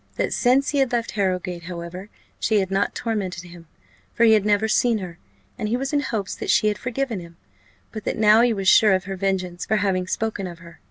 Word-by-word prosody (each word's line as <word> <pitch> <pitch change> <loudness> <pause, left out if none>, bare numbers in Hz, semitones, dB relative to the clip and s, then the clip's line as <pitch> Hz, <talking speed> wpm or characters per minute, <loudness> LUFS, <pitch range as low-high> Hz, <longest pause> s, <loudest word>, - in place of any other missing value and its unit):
That - - -1
since 265 +3 +2
he 285 - 0
had 265 -2 +2
left 235 -1 -1
Harrowgate, 180 -4 -2
however, 175 +3 -7 0.3
she 215 -2 +2
had 190 -1 -2
not 195 +1 0
tormented 200 -7 -3
him, 170 -2 -13 0.5
for 235 - +2
he 225 -1 +7
had 210 -1 +2
never 210 +1 +2
seen 230 +1 +2
her, 180 -4 -8 0.4
and 215 - -2
he 240 - +1
was 270 +3 -4
in 290 - +3
hopes 220 -8 -3
that - - -6
she 215 - +4
had 210 - -3
forgiven 255 -3 -3
him; 170 -1 -12 0.5
but 215 - -7
that - - -2
now 215 +1 +6
he 240 0 +3
was 195 -3 -2
sure 210 +1 +6
of 185 - -2
her 195 +1 -5
vengeance 185 -2 -2
for 220 - 0
having 185 -2 0
spoken 215 -2 -2
of 175 -1 -9
her. 170 -1 -15
205 Hz, 230 wpm, -23 LUFS, 185-225 Hz, 0.5 s, he